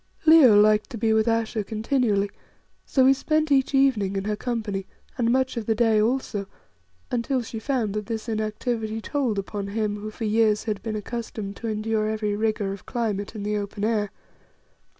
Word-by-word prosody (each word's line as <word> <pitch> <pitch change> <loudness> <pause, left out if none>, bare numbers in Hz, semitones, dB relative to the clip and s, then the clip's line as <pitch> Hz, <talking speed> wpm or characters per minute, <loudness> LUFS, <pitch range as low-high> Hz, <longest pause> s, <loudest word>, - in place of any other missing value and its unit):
Leo 295 -10 +8
liked 210 0 +4
to 245 - -6
be 220 0 +2
with 220 +1 +2
Ayesha 225 -1 0
continually, 215 -2 0 0.6
so 260 -2 +3
we 270 - +7
spent 310 +3 0
each 270 0 +3
evening 230 -8 +2
in 195 - -1
her 210 +1 -1
company, 215 -4 -3 0.3
and 235 -2 +1
much 260 0 +1
of 225 - -4
the 225 - +2
day 220 -2 +3
also, 215 -4 -1 0.6
until 245 +1 0
she 225 0 -6
found 230 -4 -1
that 210 -1 -4
this 225 0 -4
inactivity 220 0 -2
told 250 -3 -1
upon 200 0 -4
him 210 0 -1
who 210 +1 -6
for 220 +1 -5
years 215 0 +2
had 215 -3 -3
been 220 -2 -4
accustomed 215 -2 -5
to 230 - -5
endure 215 0 -1
every 215 -1 -1
rigour 210 -2 -1
of 195 - -11
climate 215 -3 -2
in 210 - -5
the 210 +1 -1
open 205 0 -5
air. 215 -2 0
220 Hz, 185 wpm, -25 LUFS, 210-235 Hz, 0.6 s, Leo